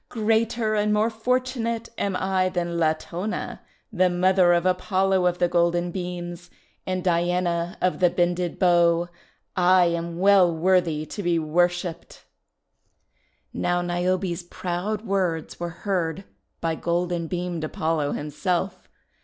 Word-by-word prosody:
Greater 225 0 +1
and 210 0 +1
more 215 +2 +2
fortunate 235 0 -1
am 200 -4 -1
I 185 0 +1
than 175 -2 -2
Latona, 170 +5 -2 0.3
the 185 -2 +3
mother 180 0 +3
of 175 0 +2
Apollo 185 0 +2
of 175 0 0
the 175 - +2
Golden 175 0 +1
Beams 175 -1 -6 0.4
and 185 -1 -2
Diana 175 -1 0
of 185 - +1
the 180 -1 +5
Bended 175 0 0
Bow. 175 -1 +3 0.5
I 180 0 +5
am 170 0 -2
well 190 -1 +5
worthy 165 -2 +1
to 205 - -6
be 175 -2 +1
worshipped!' 175 +2 -1 1.3
Now 175 0 0
Niobe's 175 +1 -1
proud 180 +5 -4
words 185 -6 -1
were 175 0 -3
heard 180 0 -2 0.4
by 165 -1 0
golden 170 0 -1
beamed 175 -1 -3
Apollo 155 -1 -1
himself. 180 +5 -3
175 Hz, 125 wpm, -24 LUFS, 170-190 Hz, 1.3 s, the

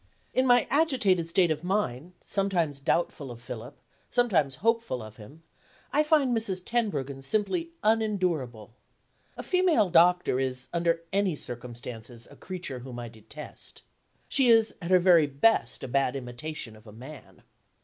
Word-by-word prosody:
In 260 +1 +2
my 245 -2 +5
agitated 245 - +2
state 175 -1 +3
of 155 +1 -2
mind, 180 -5 -2
sometimes 175 -8 -1
doubtful 140 -1 -1
of 120 -1 -9
Philip, 120 -1 -9 0.3
sometimes 170 - +2
hopeful 230 - +1
of 110 0 -12
him, 140 +10 -14 0.5
I 295 - +4
find 300 -5 +3
Mrs. 195 -5 -2
Tenbruggen 145 - -1
simply 215 - -1
unendurable. 180 - 0 0.6
A - - -6
female 345 - +2
doctor 175 -5 +4
is, 130 -1 -3
under 170 -1 0
any 195 -4 +1
circumstances, 120 -2 -8
a - - -13
creature 180 -8 -6
whom 125 0 -9
I 120 -1 -6
detest. 115 +7 -12 0.4
She 265 -3 +4
is, 225 -1 +5
at 170 - -5
her 185 - +6
very 175 -4 +5
best, 140 - +1
a - - -4
bad 135 0 0
imitation 125 -1 -6
of 110 +1 -18
a - - -11
man. 130 +8 -12
165 Hz, 150 wpm, -27 LUFS, 125-210 Hz, 0.6 s, her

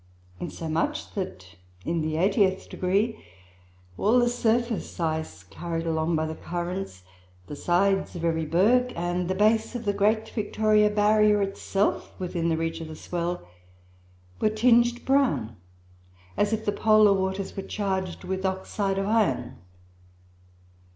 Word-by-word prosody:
Insomuch, 165 -1 -3
that 95 - -6 0.3
in 165 -1 0
the 155 0 -2
eightieth 190 +1 +2
degree, 200 +5 -1 0.8
all 220 +5 +3
the 240 -1 +4
surface 235 -3 -1
ice 160 -1 -2
carried 165 -1 -5
along 160 0 0
by 155 0 0
the 160 - -4
currents, 175 - -5 0.4
the 145 - -7
sides 195 +5 +1
of 170 -1 -3
every 160 -1 0
berg 235 +10 +3
and 175 +1 -2
the 185 - -1
base 220 +4 +2
of 235 -2 -5
the 205 - +1
great 215 +2 +1
Victoria 215 -1 +2
Barrier 210 0 +3
itself, 195 0 -1
within 175 -2 -2
reach 165 0 -3
of 160 - -6
the 155 - -8
swell, 175 - -4 0.9
were 215 - +3
tinged 240 +2 +3
brown, 265 - +1 0.8
as 205 - +1
if 220 0 -2
the 205 - +2
polar 215 -1 +5
waters 190 0 -2
were 195 - -3
charged 190 -3 -3
with 190 0 -3
oxide 195 +1 -1
of 195 - 0
iron. 220 0 0
195 Hz, 135 wpm, -26 LUFS, 170-215 Hz, 0.9 s, polar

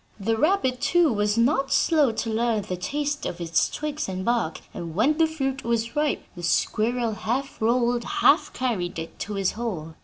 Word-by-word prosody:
The 225 +3 0
rabbit, 265 - +1
too, 345 -7 +3
was 210 +1 0
not 270 +3 +2
slow 300 -7 +3
to 225 +1 -3
learn 225 -1 +1
the 185 -2 -4
taste 290 +10 -2
of 175 - -6
its 170 -1 +1
twigs 300 -5 -4
and 185 0 -4
bark; 235 -9 0
and 165 -2 -6
when 285 - +2
the 325 - +5
fruit 270 -4 -3
was 230 0 -1
ripe, 295 0 0
the 175 - -8
squirrel 225 +6 +1
half 250 +6 -3
rolled, 240 +1 +2
half 400 0 +3
carried, 200 -10 -2
it 165 0 -7
to 210 - -4
his 195 -2 +1
hole. 185 -9 -5
235 Hz, 185 wpm, -25 LUFS, 205-280 Hz, -, the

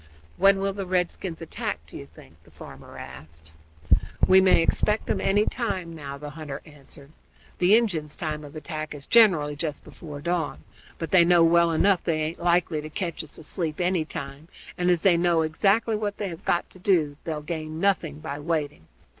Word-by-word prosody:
"When 195 0 +5
will 195 0 0
the 195 -1 -5
redskins 180 -1 -2
attack, 160 - -4
do 80 - -15
you 70 - -8
think?" 70 -1 -17
the - - -20
farmer - - -12
asked. 80 +4 -12 0.8
"We 190 0 +7
may 185 -3 +5
expect 210 +5 +1
'em - - -1
any 205 +2 +2
time, 185 -9 -3
now," 140 -3 -7
the 145 +1 -8
hunter 150 -3 -7
answered. 145 -1 -12 0.5
"The 185 +4 +5
Injuns' 165 -10 0
time 155 -2 -4
of 145 +1 -11
attack 155 -1 -5
is 145 - -9
generally 170 -11 +4
just 150 -1 -4
before 150 -4 -10
dawn, 170 0 -2 0.3
but 165 -2 -5
they 185 -2 +7
know 170 0 +5
well 170 0 +4
enough 185 +3 +3
they 155 -2 0
aint 160 +2 -4
likely 170 -3 +1
to 155 - -8
ketch 170 0 -4
us 155 - -8
asleep 160 0 -3
any 180 -2 +1
time, 140 0 -7 0.3
and, 180 0 0
as 175 -2 +2
they 185 -3 +5
know 170 -1 +2
exactly 200 +8 +2
what 210 -1 -3
they 205 - -3
have 165 -2 -10
got 175 - +1
to 185 - -15
do 165 -7 +2
they'll 155 -2 -4
gain 155 -1 -5
nothing 170 -6 0
by 140 0 -5
waiting. 150 - -3
165 Hz, 190 wpm, -25 LUFS, 150-185 Hz, 0.8 s, We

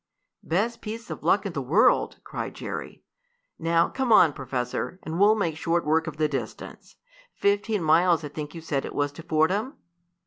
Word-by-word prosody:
"Best 210 +8 -1
piece 225 +1 -7
of - - -6
luck 205 +1 +2
in 195 - -3
the 140 - -2
world!" 150 - +3
cried - - -6
Jerry. - - -7 0.6
"Now, 165 0 +2
come 265 -3 -2
on, 165 -8 +7
Professor, 130 +6 -4
and 160 +2 -4
we'll 210 +2 +6
make 170 -7 -1
short 170 +1 0
work 160 +2 +2
of 155 -2 -6
the 155 0 +2
distance. - - -7 0.4
Fifteen 205 -1 +1
miles 165 +1 +4
I 150 - -5
think 150 +2 -7
you 165 - -7
said 145 -4 -2
it - - -7
was 145 0 0
to 145 - -10
Fordham?" 185 - 0
165 Hz, 180 wpm, -26 LUFS, 155-200 Hz, 0.6 s, on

